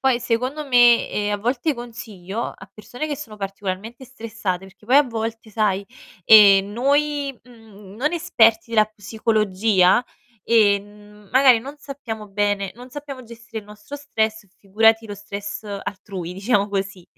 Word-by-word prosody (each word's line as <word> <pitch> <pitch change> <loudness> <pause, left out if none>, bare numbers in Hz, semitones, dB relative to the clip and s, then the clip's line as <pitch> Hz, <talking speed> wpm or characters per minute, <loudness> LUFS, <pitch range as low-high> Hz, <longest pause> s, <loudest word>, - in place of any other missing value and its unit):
Poi 260 -2 +2
secondo 255 +5 -2
me, 240 -2 +5
ehm, 205 0 -1
a - - 0
volte 245 +8 -1
consiglio 225 -4 -7
a 190 0 -15
persone 225 +9 -7
che 290 - -3
sono 230 -8 -9
particolarmente 200 +4 -6
stressate, 220 -7 -5
perché 195 +2 -20
poi 255 +4 +4
a 290 - +8
volte, 225 -3 -5
sai, 205 -2 0 0.4
ehm, 200 -2 +8
noi, 280 +3 0
mhmm, 215 -5 -16
non 300 +6 -1
esperti 230 -10 +2
della 215 -2 +4
psicologia, 215 -1 +1 0.4
ehm, 210 -1 0
magari 260 -2 +6
non 275 +6 -9
sappiamo 245 -7 -8
bene 200 -1 -1
non 245 +2 -12
sappiamo 275 -2 -8
gestire 230 0 -9
il 215 - -10
nostro 210 +7 -10
stress, 220 -7 -2
figurati 225 +3 +2
lo 205 - -6
stress 205 +1 -7
altrui, 195 -3 -6
diciamo 200 +2 0
così. 195 -2 -4
220 Hz, 145 wpm, -21 LUFS, 205-245 Hz, 0.4 s, a